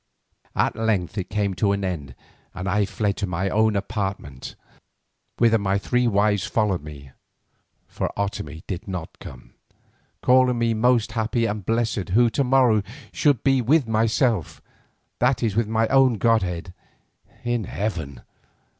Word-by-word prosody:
At -, -, +1 dB
length 105 Hz, -6 st, -1 dB
it 95 Hz, -, -5 dB
came 100 Hz, -2 st, -1 dB
to 100 Hz, +1 st, +1 dB
an 100 Hz, 0 st, -2 dB
end 75 Hz, -8 st, -5 dB, 0.4 s
and 90 Hz, +1 st, -5 dB
I 100 Hz, +2 st, +2 dB
fled 100 Hz, 0 st, -1 dB
to 100 Hz, -, -2 dB
my 90 Hz, +2 st, -2 dB
own 110 Hz, 0 st, +2 dB
apartments, 100 Hz, -, -4 dB, 0.8 s
whither 115 Hz, -1 st, +4 dB
my 100 Hz, -1 st, 0 dB
three 125 Hz, +4 st, 0 dB
wives 105 Hz, -2 st, +2 dB
followed 105 Hz, -6 st, 0 dB
me, 70 Hz, -3 st, -11 dB, 0.8 s
for -, -, -3 dB
Otomie 80 Hz, -6 st, -4 dB
did 95 Hz, 0 st, -6 dB
not 90 Hz, -4 st, -6 dB
come, -, -, -12 dB, 0.7 s
calling 125 Hz, -1 st, +4 dB
me 115 Hz, -1 st, +1 dB
most 115 Hz, 0 st, +2 dB
happy 115 Hz, +1 st, 0 dB
and 105 Hz, -2 st, -3 dB
blessed 115 Hz, -2 st, -1 dB
who 120 Hz, 0 st, +4 dB
to 140 Hz, -, +1 dB
morrow 125 Hz, -4 st, +4 dB, 0.3 s
should 145 Hz, -6 st, +2 dB
be 135 Hz, -1 st, +3 dB
with 135 Hz, +2 st, +2 dB
myself, 110 Hz, -, +1 dB, 0.6 s
that 125 Hz, -1 st, +2 dB
is 110 Hz, -4 st, 0 dB
with 115 Hz, -1 st, +1 dB
my 110 Hz, +1 st, +1 dB
own 135 Hz, -3 st, +4 dB
godhead, 95 Hz, -6 st, 0 dB, 0.7 s
in 120 Hz, -3 st, -1 dB
heaven. 80 Hz, -, -4 dB
105 Hz, 145 wpm, -23 LUFS, 95-115 Hz, 0.8 s, whither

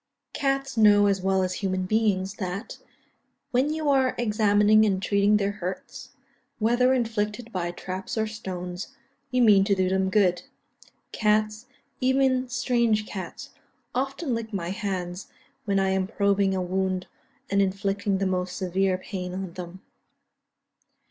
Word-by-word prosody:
_) -, -, -56 dB
Cats 275 Hz, -1 st, -1 dB
know 205 Hz, -2 st, +6 dB
as 195 Hz, -2 st, +1 dB
well 190 Hz, 0 st, +2 dB
as 185 Hz, 0 st, -1 dB
a -, -, -5 dB
human 185 Hz, -2 st, -1 dB
beings, 195 Hz, -2 st, +1 dB
that, 190 Hz, +3 st, -5 dB, 0.7 s
when 260 Hz, +4 st, +2 dB
you 310 Hz, -1 st, -2 dB
are 265 Hz, -2 st, +3 dB
examining 215 Hz, -1 st, +4 dB
and 195 Hz, -3 st, +2 dB
treating 200 Hz, +1 st, +3 dB
their 200 Hz, -1 st, 0 dB
hurts 185 Hz, -2 st, -7 dB, 0.5 s
whether 240 Hz, +3 st, +3 dB
inflicted 230 Hz, -2 st, -1 dB
by 175 Hz, -4 st, -2 dB
traps 185 Hz, +6 st, -6 dB
or 220 Hz, -, +1 dB
stones 185 Hz, -4 st, -6 dB, 0.3 s
you 250 Hz, -1 st, +2 dB
mean 205 Hz, -4 st, +6 dB
to 200 Hz, 0 st, +2 dB
do 185 Hz, -1 st, +1 dB
them 190 Hz, 0 st, +1 dB
good. 185 Hz, -3 st, +2 dB, 0.7 s
Cats, 215 Hz, +1 st, 0 dB, 0.3 s
even 260 Hz, -1 st, +2 dB
strange 240 Hz, -4 st, +1 dB
cats, 190 Hz, -4 st, -7 dB, 0.4 s
often 270 Hz, +2 st, -2 dB
lick 230 Hz, -1 st, -4 dB
my 175 Hz, -4 st, -3 dB
hands 190 Hz, -3 st, -4 dB, 0.4 s
when 200 Hz, -2 st, +1 dB
I 190 Hz, 0 st, +1 dB
am 190 Hz, 0 st, 0 dB
probing 200 Hz, -2 st, +1 dB
a 185 Hz, -, -1 dB
wound 185 Hz, 0 st, -1 dB, 0.5 s
and 200 Hz, 0 st, +3 dB
inflicting 195 Hz, +1 st, 0 dB
the 195 Hz, -, -1 dB
most 180 Hz, -1 st, -1 dB
severe 190 Hz, 0 st, 0 dB
pain 185 Hz, -1 st, -6 dB
on 190 Hz, -2 st, -5 dB
them. 180 Hz, +1 st, -8 dB
200 Hz, 150 wpm, -26 LUFS, 185-225 Hz, 0.7 s, know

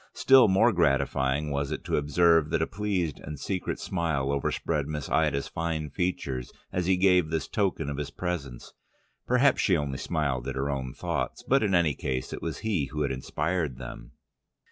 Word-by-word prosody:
Still 135 Hz, -3 st, +6 dB
more 100 Hz, +5 st, +4 dB
gratifying 70 Hz, -2 st, +1 dB
was 70 Hz, 0 st, -1 dB
it -, -, -4 dB
to -, -, -1 dB
observe 80 Hz, +2 st, +3 dB
that -, -, 0 dB
a -, -, +2 dB
pleased 95 Hz, -7 st, -2 dB
and 75 Hz, -1 st, -8 dB
secret 95 Hz, -3 st, -3 dB
smile 80 Hz, -7 st, -1 dB
overspread 70 Hz, +1 st, -1 dB
Miss 75 Hz, -2 st, -4 dB
Ida's 70 Hz, -2 st, +1 dB
fine 80 Hz, -3 st, -3 dB
features 70 Hz, -7 st, -2 dB, 0.2 s
as 90 Hz, -1 st, -1 dB
he 95 Hz, -1 st, +3 dB
gave 90 Hz, -3 st, +4 dB
this 80 Hz, -3 st, -2 dB
token 95 Hz, -8 st, -1 dB
of 70 Hz, -1 st, -3 dB
his 75 Hz, -1 st, -3 dB
presence: 70 Hz, -7 st, -5 dB, 0.5 s
perhaps 125 Hz, +2 st, +4 dB
she 95 Hz, -4 st, +3 dB
only 70 Hz, -3 st, -3 dB
smiled 70 Hz, -6 st, -1 dB
at -, -, -3 dB
her 70 Hz, +2 st, -1 dB
own 65 Hz, -2 st, -4 dB
thoughts, -, -, -3 dB
but 135 Hz, +1 st, +3 dB
in 100 Hz, -3 st, +2 dB
any 85 Hz, -4 st, +3 dB
case 65 Hz, -1 st, -3 dB
it -, -, -6 dB
was 80 Hz, -4 st, -4 dB
he 95 Hz, -10 st, +1 dB
who 75 Hz, +2 st, -3 dB
had 70 Hz, -, -1 dB
inspired 75 Hz, +2 st, -2 dB
them. -, -, -9 dB
75 Hz, 185 wpm, -27 LUFS, 70-90 Hz, 0.5 s, Still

